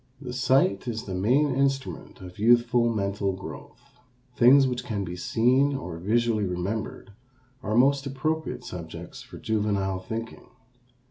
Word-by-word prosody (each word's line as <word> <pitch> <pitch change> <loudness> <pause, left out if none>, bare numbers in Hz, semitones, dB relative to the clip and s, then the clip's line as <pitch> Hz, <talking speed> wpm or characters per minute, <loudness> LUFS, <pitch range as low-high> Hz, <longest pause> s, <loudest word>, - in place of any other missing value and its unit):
The 125 -3 -7
sight 130 -4 +2
is 110 -2 -3
the 95 - -6
main 130 +10 +2
instrument 135 -4 -2
of 90 0 -11
youthful 120 +1 +4
mental 100 -2 -1
growth. 95 +5 -11 0.4
Things 135 +3 +6
which 125 -1 -2
can 105 -5 -3
be 90 -1 -5
seen 125 +9 +2
or 90 -11 -6
visually 110 +3 +1
remembered 100 +4 -4 0.5
are 110 -3 -2
most 140 +3 +3
appropriate 155 +4 -2
subjects 85 -3 -8
for - - -12
juvenile 100 -3 -1
thinking. 115 +4 -7
115 Hz, 135 wpm, -26 LUFS, 100-130 Hz, 0.5 s, Things